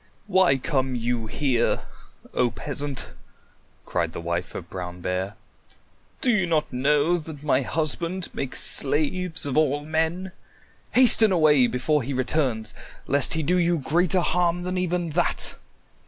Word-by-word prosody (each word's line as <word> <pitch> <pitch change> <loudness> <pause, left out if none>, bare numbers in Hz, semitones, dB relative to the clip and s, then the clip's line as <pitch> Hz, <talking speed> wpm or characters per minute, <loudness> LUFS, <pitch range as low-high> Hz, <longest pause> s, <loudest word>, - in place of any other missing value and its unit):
"Why 185 -8 +3
come 130 -2 -1
you 120 -1 -2
here, 125 -1 0 0.5
O 125 -1 +2
Peasant?" 145 +1 -5 0.8
cried 85 -1 -2
the - - -5
wife 85 +1 -3
of 85 - -6
Brown 90 -1 -7
Bear. 95 +3 -3 0.9
"Do 250 - +3
you 190 -6 +1
not 155 -4 0
know 150 +6 +2
that 150 -2 -10
my 140 -3 +2
husband 165 +5 -3
makes 135 -2 -2
slaves 155 +4 +1
of 140 - -3
all 145 -1 +1
men? 160 +4 -1 0.6
Hasten 230 -4 +6
away 150 -7 +4
before 135 +5 0
he 135 +3 -4
returns 130 -4 0 0.3
lest 140 -1 +1
he 160 - -1
do 180 +5 +2
you 175 -1 +2
greater 175 +6 +2
harm 175 0 +1
than 180 +1 -3
even 180 -2 -1
that." 170 +2 +1
150 Hz, 140 wpm, -24 LUFS, 125-175 Hz, 0.9 s, Hasten